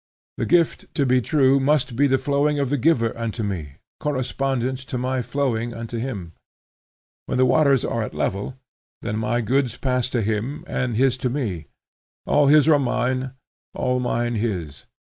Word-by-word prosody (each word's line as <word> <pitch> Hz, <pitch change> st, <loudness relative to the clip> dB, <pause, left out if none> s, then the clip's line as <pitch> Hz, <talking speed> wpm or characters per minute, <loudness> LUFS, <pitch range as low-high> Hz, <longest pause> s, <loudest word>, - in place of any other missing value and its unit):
The -, -, -1 dB
gift, 170 Hz, -1 st, +2 dB
to 140 Hz, -, +2 dB
be 130 Hz, 0 st, +3 dB
true, 135 Hz, 0 st, +3 dB
must 135 Hz, -3 st, +1 dB
be 140 Hz, +4 st, +4 dB
the 135 Hz, 0 st, +3 dB
flowing 145 Hz, +2 st, +1 dB
of 140 Hz, -2 st, -1 dB
the 145 Hz, -, +2 dB
giver 120 Hz, -5 st, +2 dB
unto 115 Hz, -1 st, -3 dB
me, 85 Hz, -9 st, -4 dB, 0.2 s
correspondent 130 Hz, -2 st, -1 dB
to 125 Hz, -, -2 dB
my 130 Hz, +1 st, -1 dB
flowing 120 Hz, -3 st, -1 dB
unto 115 Hz, 0 st, -5 dB
him. 100 Hz, -9 st, -5 dB, 0.9 s
When -, -, -1 dB
the 130 Hz, -, +5 dB
waters 140 Hz, -1 st, +3 dB
are 115 Hz, -, -1 dB
at 110 Hz, -, -5 dB
level, 105 Hz, +7 st, -2 dB, 0.5 s
then 110 Hz, -1 st, -2 dB
my 120 Hz, +1 st, 0 dB
goods 125 Hz, +1 st, 0 dB
pass 125 Hz, -2 st, 0 dB
to 120 Hz, -3 st, 0 dB
him, 110 Hz, +7 st, -2 dB
and 120 Hz, -4 st, -2 dB
his 130 Hz, 0 st, +3 dB
to 125 Hz, -, 0 dB
me. 110 Hz, -, -3 dB, 0.6 s
All 145 Hz, -1 st, +3 dB
his 150 Hz, +1 st, +6 dB
are 150 Hz, -2 st, +6 dB
mine, 130 Hz, 0 st, -1 dB, 0.4 s
all 125 Hz, 0 st, 0 dB
mine 120 Hz, -1 st, -1 dB
his. 90 Hz, -10 st, -3 dB
125 Hz, 170 wpm, -23 LUFS, 115-135 Hz, 0.9 s, his